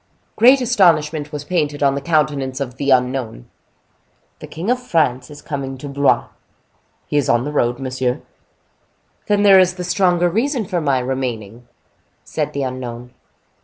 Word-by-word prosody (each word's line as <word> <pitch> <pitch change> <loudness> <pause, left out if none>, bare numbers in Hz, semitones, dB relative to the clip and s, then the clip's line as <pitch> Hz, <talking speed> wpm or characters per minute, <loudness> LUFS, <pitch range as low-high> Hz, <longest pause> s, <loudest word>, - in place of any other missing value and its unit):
Great 255 +4 +6
astonishment 160 -10 +2
was 150 -1 -5
painted 150 -3 -1
on 140 -1 +3
the 140 - -3
countenance 145 -4 0
of 130 -2 -5
the 140 +1 -2
unknown. 125 - 0 0.9
"The - - -9
King 175 +9 -3
of 250 0 0
France 145 - 0
is 145 0 -12
coming 135 -2 -5
to 145 - -8
Blois?" 140 0 +2 0.8
"He 150 - -2
is 140 -1 +1
on 120 -2 +3
the 145 - -4
road, 120 -4 0
monsieur." 130 0 -2 1.1
"Then 205 -1 +2
there 195 -2 +7
is 185 0 +3
the 180 - -5
stronger 180 -1 +2
reason 235 - -1
for 180 -2 -2
my 140 -3 +1
remaining," 125 -3 -4 0.6
said - - -3
the 140 - -2
unknown. 125 -1 -6
145 Hz, 160 wpm, -19 LUFS, 130-175 Hz, 1.1 s, there